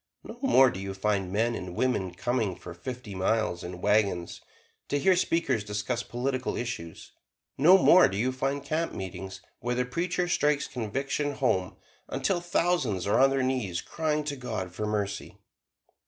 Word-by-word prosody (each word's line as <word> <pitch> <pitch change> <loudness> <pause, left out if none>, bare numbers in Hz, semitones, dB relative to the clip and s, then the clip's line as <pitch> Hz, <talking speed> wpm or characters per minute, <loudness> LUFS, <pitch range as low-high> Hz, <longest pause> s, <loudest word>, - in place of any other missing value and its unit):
No 240 - -10
more 135 - +5
do 95 - -6
you 95 0 -5
find 100 -2 0
men 115 +4 +1
and 90 -5 -6
women 95 -8 0
coming 110 -3 -1
for 90 0 -9
fifty 120 +4 -7
miles, 95 -1 0
in 90 0 -7
wagons, 100 -4 +1 0.5
to 145 - +1
hear 185 +6 +4
speakers 165 - +1
discuss 105 +4 -2
political 130 +2 -2
issues; 100 -9 -6 0.4
no 175 +8 +7
more 185 -1 +7
do 95 - -4
you 125 +5 +1
find 135 +2 -2
campmeetings 95 - -4 0.2
where 120 +1 -2
the 125 0 0
preacher 175 +6 -1
strikes 150 -4 +2
conviction 135 +5 -2
home 95 -10 0 0.3
until 180 -3 0
thousands 170 - 0
are 100 - +2
on 135 +1 +6
their 135 -1 0
knees 125 -10 -1
crying 155 - -1
to 145 -1 -3
God 110 -8 -5
for 105 +3 -3
mercy. 100 -1 -3
120 Hz, 160 wpm, -28 LUFS, 95-140 Hz, 0.5 s, no